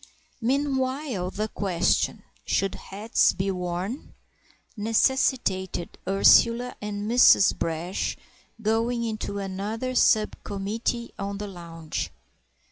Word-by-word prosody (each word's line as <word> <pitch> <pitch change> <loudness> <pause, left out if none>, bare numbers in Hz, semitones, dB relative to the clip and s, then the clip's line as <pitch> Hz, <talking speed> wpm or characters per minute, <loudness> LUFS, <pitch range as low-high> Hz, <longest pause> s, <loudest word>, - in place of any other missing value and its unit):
Meanwhile 260 -4 -1
the 210 +3 -3
question, 185 -5 0 0.2
"Should 195 -1 0
hats 210 +3 +1
be 195 +1 -1
worn?" 180 - -4 0.6
necessitated 215 -5 0
Ursula 230 +5 +5
and 205 0 -4
Mrs. 235 -4 +6
Brash 165 +3 -2 0.4
going 230 +2 0
into 215 -3 -3
another 205 +6 -3
sub 215 -3 +3
committee 220 +4 -3
on 200 0 -3
the 205 - -5
lounge. 170 -4 -6
205 Hz, 95 wpm, -26 LUFS, 190-235 Hz, 0.6 s, Mrs